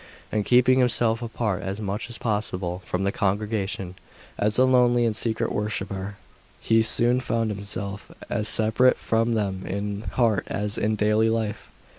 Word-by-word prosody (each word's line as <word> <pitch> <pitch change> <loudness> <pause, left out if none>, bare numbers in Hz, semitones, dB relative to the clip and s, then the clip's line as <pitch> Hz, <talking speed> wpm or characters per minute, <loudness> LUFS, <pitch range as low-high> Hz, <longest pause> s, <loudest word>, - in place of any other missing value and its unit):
And 105 -1 -1
keeping 125 +1 +5
himself 120 -2 +2
apart 115 -4 -2
as 95 +2 -4
much 105 +2 -4
as 120 - -6
possible 95 -5 -2
from 90 +1 -2
the 100 - +1
congregation, 100 -2 -2 0.4
as 105 +1 +1
a 130 - +5
lonely 120 -2 +4
and 110 -2 0
secret 115 +1 0
worshipper, 100 -1 -3 0.4
he 115 0 +3
soon 120 +2 +2
found 115 -3 -1
himself 100 -1 -4 0.2
as 105 - -1
separate 110 +4 +4
from 115 +1 0
them 100 -4 -2
in 100 +1 -4
heart 115 -6 +1
as 105 +1 -3
in 110 +1 +1
daily 105 +1 +2
life. 110 -2 -2
110 Hz, 155 wpm, -24 LUFS, 100-115 Hz, 0.4 s, keeping